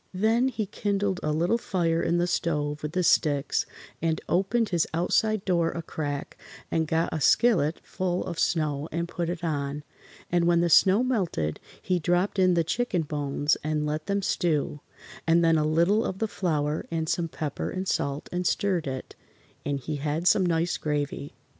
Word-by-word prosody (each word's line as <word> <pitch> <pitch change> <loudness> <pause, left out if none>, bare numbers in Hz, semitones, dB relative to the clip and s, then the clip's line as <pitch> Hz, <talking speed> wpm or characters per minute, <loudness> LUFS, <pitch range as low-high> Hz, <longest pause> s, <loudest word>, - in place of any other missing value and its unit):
Then 225 +6 +3
he 225 -5 -2
kindled 200 -1 -1
a 155 - -1
little 170 +9 +1
fire 170 -6 0
in 170 - +1
the 175 - +2
stove 150 -4 -1
with 150 +1 -4
the 185 - +1
sticks 145 -4 +2 0.3
and 160 -1 0
opened 195 +6 +1
his 170 -3 +1
outside 210 +4 +1
door 170 -3 +2
a 165 - -5
crack 145 -2 -5 0.3
and 160 -1 +1
got 160 +2 0
a 155 - -2
skillet 170 - +3
full 185 -1 -2
of 170 -2 -5
snow 155 -3 0
and 170 +1 -2
put 170 -1 -3
it 175 -1 -4
on, 145 -2 -2 0.5
and 175 -1 +2
when 170 -1 +4
the 170 0 +1
snow 195 +8 +6
melted 175 - -1 0.2
he 180 -1 0
dropped 175 +4 +1
in 185 -1 +4
the 170 - +3
chicken 180 0 -1
bones 145 0 0
and 155 0 -1
let 155 +1 -3
them 200 0 0
stew, 150 -5 0 0.5
and 165 +1 +4
then 165 0 +4
a - - +2
little 170 +8 +3
of 190 - -3
the 220 - -1
flour 155 -7 -1
and 160 -1 -2
some 170 +1 0
pepper 155 -3 -4
and 185 +1 -4
salt 140 -3 -1
and 180 0 -1
stirred 185 -6 0
it, 130 -1 -5 0.5
and 140 -1 -2
he 150 +2 -4
had 150 +4 -1
some 190 - +5
nice 170 0 +1
gravy. 145 -1 -3
170 Hz, 185 wpm, -27 LUFS, 150-185 Hz, 0.5 s, snow